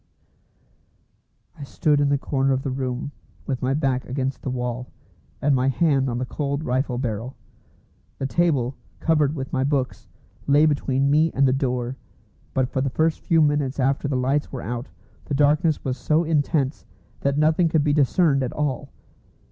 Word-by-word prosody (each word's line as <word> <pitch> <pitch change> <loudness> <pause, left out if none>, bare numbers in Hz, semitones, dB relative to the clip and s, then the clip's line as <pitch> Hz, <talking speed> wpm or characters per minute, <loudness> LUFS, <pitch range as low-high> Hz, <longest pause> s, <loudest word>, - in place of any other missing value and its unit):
I - - -9
stood 145 +1 +1
in 145 - +2
the 140 - +3
corner 135 0 0
of 130 0 -1
the 135 - -2
room 130 +1 -3 0.3
with 130 -3 -3
my 130 +1 +1
back 135 -4 0
against 130 +1 -3
the - - -4
wall, 125 0 -3 0.5
and 145 0 +2
my 130 +1 +1
hand 135 -1 +2
on 120 - -2
the 125 - -2
cold 140 +2 -3
rifle 130 -1 -1
barrel. 120 0 -3 0.8
The 135 - -3
table, 135 -5 +1 0.2
covered 155 -2 +2
with 135 -2 -6
my 130 - +1
books, 135 -2 -1 0.4
lay 145 +2 +5
between 140 -2 +1
me 155 +2 +3
and 135 0 +3
the 130 - +3
door, 125 -1 -1 0.6
but 130 -1 +2
for 130 - -2
the 135 - 0
first 160 +4 +1
few 165 -2 +3
minutes 145 -2 0
after 135 +2 +1
the 140 -2 0
lights 135 +3 0
were 130 - -5
out 120 +3 -4 0.4
the 145 - -2
darkness 150 +2 +2
was 130 -1 -2
so 155 +6 +2
intense 150 -3 0 0.4
that 140 0 0
nothing 155 +3 +3
could 155 -2 +2
be 145 -1 +2
discerned 145 0 +3
at 130 - -2
all. 145 -4 -2
135 Hz, 175 wpm, -23 LUFS, 130-150 Hz, 0.8 s, lay